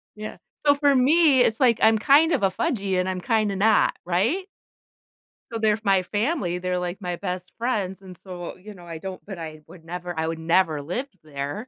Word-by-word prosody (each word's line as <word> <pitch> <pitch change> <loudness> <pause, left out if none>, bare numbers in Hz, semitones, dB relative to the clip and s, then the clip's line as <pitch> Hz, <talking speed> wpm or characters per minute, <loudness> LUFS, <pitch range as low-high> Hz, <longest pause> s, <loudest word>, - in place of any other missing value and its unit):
Yeah, 215 0 -7 0.3
so 285 - +7
for 285 -1 +3
me, 280 0 +5
it's 225 0 +2
like 240 -4 +4
I'm 220 0 +6
kind 290 +9 +5
of - - +1
a 195 - +4
fudgy, 195 - -1
and 180 - 0
I'm 185 -1 -3
kinda 215 -3 +1
not, 215 +3 +3
right? 225 - 0 1.1
So 230 - -3
they're 215 -1 +3
f 215 - -4
my 195 -2 +3
family, 205 - -1
they're, 180 0 -2
like, 180 +2 -4
my 180 -1 -3
best 180 -2 -5
friends, 205 -6 -2
and 185 -2 -12
so, 180 -1 -8
you 210 +3 -11
know, 175 -2 -14
I 165 -1 -7
don't 190 +2 -7
but, 195 -3 -7
I 155 -2 -8
would 165 -3 -15
never 175 0 -6
I 160 0 0
would 165 0 -3
never 160 -2 +2
live 210 - -4 0.2
there. 145 - -5
190 Hz, 210 wpm, -24 LUFS, 175-225 Hz, 1.1 s, so